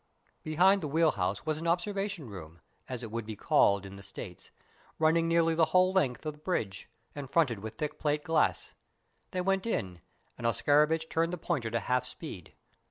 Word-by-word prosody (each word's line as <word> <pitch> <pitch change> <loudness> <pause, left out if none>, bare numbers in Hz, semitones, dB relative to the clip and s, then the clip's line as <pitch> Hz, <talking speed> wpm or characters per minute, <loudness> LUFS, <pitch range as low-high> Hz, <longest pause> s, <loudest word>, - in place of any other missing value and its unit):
Behind 185 +6 +4
the 155 - -2
wheel 160 +2 +3
house 95 +4 -2
was 155 -1 -1
an 165 - -4
observation 195 -2 -1
room, 85 -5 -10 0.3
as 125 -1 -5
it 115 - -6
would 115 +1 -3
be 110 - -5
called 100 0 +3
in 95 0 -9
the - - -10
States, - - -9 0.5
running 165 +1 +3
nearly 165 0 +3
the 160 0 +4
whole 185 +1 +4
length 145 -8 +1
of 155 - -2
the 150 - -19
bridge, 110 - -3 0.2
and 140 -3 -7
fronted 135 -9 +2
with 110 +2 -8
thick 150 0 -4
plate 150 0 0
glass. 165 -2 +1 0.6
They 185 - -2
went 195 +3 0
in, 95 - -2 0.4
and 115 - 0
Oscarovitch 150 +6 +3
turned 165 +1 0
the 180 - -3
pointer 130 -7 -2
to 115 0 -1
half 125 +3 0
speed. 115 - -9
150 Hz, 190 wpm, -30 LUFS, 115-165 Hz, 0.6 s, Behind